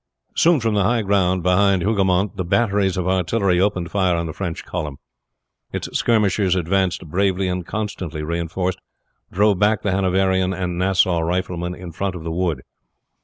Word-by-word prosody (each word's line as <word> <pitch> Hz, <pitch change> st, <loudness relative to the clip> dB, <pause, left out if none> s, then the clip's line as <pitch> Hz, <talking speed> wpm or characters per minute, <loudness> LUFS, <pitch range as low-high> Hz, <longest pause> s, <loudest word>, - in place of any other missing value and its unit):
Soon 170 Hz, -2 st, +4 dB
from 115 Hz, -2 st, 0 dB
the 105 Hz, -, +2 dB
high 115 Hz, +3 st, +1 dB
ground 95 Hz, -3 st, +1 dB
behind 95 Hz, 0 st, +3 dB
Hougoumont 95 Hz, -1 st, +1 dB
the 95 Hz, -, -2 dB
batteries 100 Hz, 0 st, +1 dB
of 90 Hz, -1 st, -1 dB
artillery 95 Hz, 0 st, +1 dB
opened 95 Hz, -4 st, 0 dB
fire 95 Hz, -3 st, +2 dB
on 85 Hz, 0 st, -1 dB
the 80 Hz, -, -5 dB
French 85 Hz, -2 st, -5 dB
column. 75 Hz, -6 st, -4 dB, 0.7 s
Its -, -, -5 dB
skirmishers 100 Hz, -4 st, +2 dB
advanced 90 Hz, +1 st, 0 dB
bravely, 95 Hz, +3 st, 0 dB
and 90 Hz, 0 st, -2 dB
constantly 90 Hz, -7 st, -4 dB
reinforced, 85 Hz, +3 st, -2 dB, 0.5 s
drove 100 Hz, 0 st, +2 dB
back 105 Hz, 0 st, +2 dB
the 100 Hz, -, 0 dB
Hanoverian 95 Hz, 0 st, +1 dB
and 90 Hz, -1 st, -3 dB
Nassau 95 Hz, -2 st, +2 dB
riflemen 90 Hz, +1 st, -2 dB
in 90 Hz, -1 st, -9 dB
front 95 Hz, +3 st, -3 dB
of 85 Hz, -, -7 dB
the 80 Hz, -, -4 dB
wood. 85 Hz, -5 st, -1 dB
95 Hz, 165 wpm, -21 LUFS, 90-100 Hz, 0.7 s, Soon